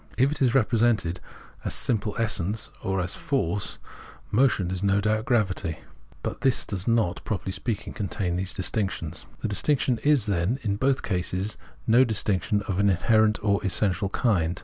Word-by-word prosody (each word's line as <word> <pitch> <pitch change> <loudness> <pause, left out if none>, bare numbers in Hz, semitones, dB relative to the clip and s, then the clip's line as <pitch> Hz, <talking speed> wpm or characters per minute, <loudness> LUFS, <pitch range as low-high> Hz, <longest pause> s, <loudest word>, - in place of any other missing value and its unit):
If 130 +3 +4
it 150 - -4
is 125 -2 +3
represented 110 -7 +2 0.4
as - - -3
simple 110 -3 -1
essence 110 -2 -1
or 95 -1 0
as 90 0 -2
force, 105 - -2 0.5
motion 105 -7 +2
is 95 -1 -3
no 100 0 +3
doubt 110 +1 0
gravity; 95 - 0 0.5
but - - -4
this 130 -2 +2
does 95 -3 -4
not, 115 -6 +1
properly 95 -2 -3
spealdng, 110 +2 -3
contain 95 -4 -2
these 95 +1 -2
distinctions. 95 -5 -2
The - - -1
distinction 125 +3 +1
is, 145 -7 +3
then, 100 +4 0
in 100 -2 0
both 135 +3 +1
cases 95 +1 -2 0.3
no 120 +3 +6
distinction 105 -3 0
of 95 -2 -2
an 100 0 +4
inherent 105 +3 +3
or 100 -1 +2
essential 95 0 +1
kind. 90 -7 +1
105 Hz, 160 wpm, -26 LUFS, 95-115 Hz, 0.5 s, no